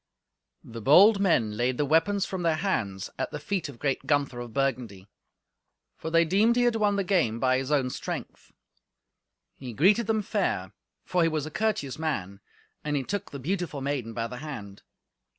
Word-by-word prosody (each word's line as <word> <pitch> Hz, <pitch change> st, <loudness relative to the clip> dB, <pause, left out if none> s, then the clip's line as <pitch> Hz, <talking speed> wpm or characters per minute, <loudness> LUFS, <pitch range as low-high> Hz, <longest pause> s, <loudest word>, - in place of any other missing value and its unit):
The 115 Hz, 0 st, -9 dB
bold 195 Hz, -, +7 dB
men 125 Hz, -, +2 dB
laid 125 Hz, +3 st, 0 dB
the 145 Hz, -, +1 dB
weapons 165 Hz, +7 st, +2 dB
from 190 Hz, -2 st, -4 dB
their 165 Hz, -2 st, +2 dB
hands 110 Hz, -, -2 dB
at -, -, -1 dB
the -, -, -5 dB
feet 170 Hz, +2 st, -3 dB
of 135 Hz, -, -11 dB
great 135 Hz, +1 st, -2 dB
Gunther 140 Hz, -4 st, +1 dB
of 120 Hz, -1 st, -7 dB
Burgundy. 120 Hz, -8 st, -2 dB, 0.9 s
For 160 Hz, -, -6 dB
they 165 Hz, +1 st, +4 dB
deemed 205 Hz, +8 st, +3 dB
he 245 Hz, -, +3 dB
had 240 Hz, -1 st, +2 dB
won 210 Hz, -2 st, +2 dB
the 200 Hz, -, 0 dB
game 170 Hz, -, +1 dB
by 130 Hz, 0 st, +2 dB
his 135 Hz, +2 st, -4 dB
own 135 Hz, -4 st, +1 dB
strength. -, -, -6 dB, 1.0 s
He 125 Hz, -3 st, -8 dB
greeted 205 Hz, -, +3 dB
them 220 Hz, -1 st, +1 dB
fair, 100 Hz, -, -1 dB, 0.3 s
for 180 Hz, -, +1 dB
he 165 Hz, -, +4 dB
was 155 Hz, -2 st, -2 dB
a 155 Hz, -, -7 dB
courteous 190 Hz, -9 st, -1 dB
man, 100 Hz, -, -3 dB, 0.4 s
and 150 Hz, -1 st, -1 dB
he 140 Hz, -, 0 dB
took 200 Hz, +6 st, -4 dB
the 140 Hz, -, -7 dB
beautiful 165 Hz, +1 st, -3 dB
maiden 135 Hz, -5 st, -3 dB
by 115 Hz, -, -1 dB
the 125 Hz, +2 st, -7 dB
hand. 120 Hz, -9 st, -8 dB
150 Hz, 185 wpm, -27 LUFS, 125-190 Hz, 1.0 s, bold